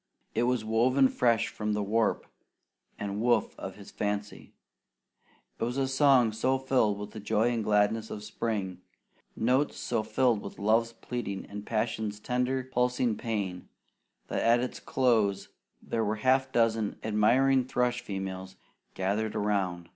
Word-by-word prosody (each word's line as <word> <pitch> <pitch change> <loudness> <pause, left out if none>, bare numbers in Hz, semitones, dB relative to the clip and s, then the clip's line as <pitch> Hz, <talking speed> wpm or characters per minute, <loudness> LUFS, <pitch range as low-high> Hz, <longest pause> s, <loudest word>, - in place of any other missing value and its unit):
It - - +1
was 125 -3 0
woven 125 +5 +3
fresh 115 -3 +2
from 105 0 -3
the 105 0 -1
warp 110 +2 +1 0.7
and 100 +1 -3
woof 120 +1 +2
of - - -6
his - - -12
fancy. 105 0 -4 1.1
It - - -1
was 120 +3 -2
a 135 -1 +1
song 135 -4 +4
so 130 +5 +1
filled 130 -6 +1
with 105 0 -7
the 110 - -8
joy 110 +3 +1
and 115 -2 -1
gladness 105 +1 +2
of 105 - -6
spring, 100 -5 -3 0.5
notes 130 +6 +1
so 115 -2 -1
thrilled 110 +1 +1
with - - -8
love's 115 +3 +2
pleading 115 -4 -5
and 105 0 -8
passion's 110 -2 -2
tender 125 +3 -1
pulsing 125 -2 0
pain, 100 -6 -4 0.6
that - - -2
at 115 +1 +4
its 125 +1 -3
close 110 -7 +1 0.3
there 115 - -1
were 105 0 0
a - - -11
half 130 +1 +3
dozen 115 -3 +1
admiring 125 +5 +3
thrush 125 -1 0
females 95 -3 -5 0.4
gathered 105 +3 -1
around. 95 -5 -1
110 Hz, 150 wpm, -29 LUFS, 105-125 Hz, 1.1 s, song